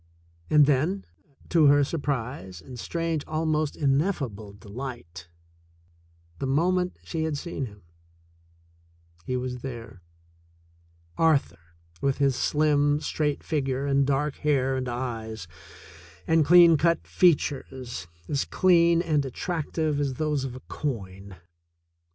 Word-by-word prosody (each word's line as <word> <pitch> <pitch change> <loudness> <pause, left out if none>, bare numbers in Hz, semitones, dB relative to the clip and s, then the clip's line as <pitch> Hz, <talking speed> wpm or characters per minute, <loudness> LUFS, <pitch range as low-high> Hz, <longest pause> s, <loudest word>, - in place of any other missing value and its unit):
And 150 -1 +6
then, 150 +8 +1 0.4
to 160 -4 +5
her 145 0 +6
surprise 130 - -3
and 125 +7 -11
strange, 165 +2 -2
almost 155 -1 -1
ineffable 135 - -1
de 100 +2 -16
light, 100 -8 -7 1.1
the 135 - -2
moment 180 +6 +1
she 165 - -4
had 160 -2 -1
seen 140 -4 -4
him, 105 -3 -15 1.4
he 125 - -1
was 125 0 -4
there 115 -6 -8 0.6
— 85 0 -34
Arthur, 85 - -1 0.3
with 140 -1 +1
his 140 -2 +2
slim, 145 0 +2
straight 150 -1 -2
figure 135 -3 -1
and 140 -1 +2
dark 145 +1 0
hair 135 -3 +1
and 130 -1 -2
eyes 115 -5 -5 0.8
and 160 -2 +3
clean 170 -1 +7
cut 170 +2 +1
features, 130 - 0 0.2
as 140 -2 -1
clean 170 -2 +4
and 150 -4 +1
attrac 160 +4 -4
tive 155 -3 0
as 140 -3 -1
those 150 -1 -1
of 130 -2 -6
a 130 - -9
coin. 100 -8 -5
140 Hz, 125 wpm, -26 LUFS, 120-155 Hz, 1.4 s, clean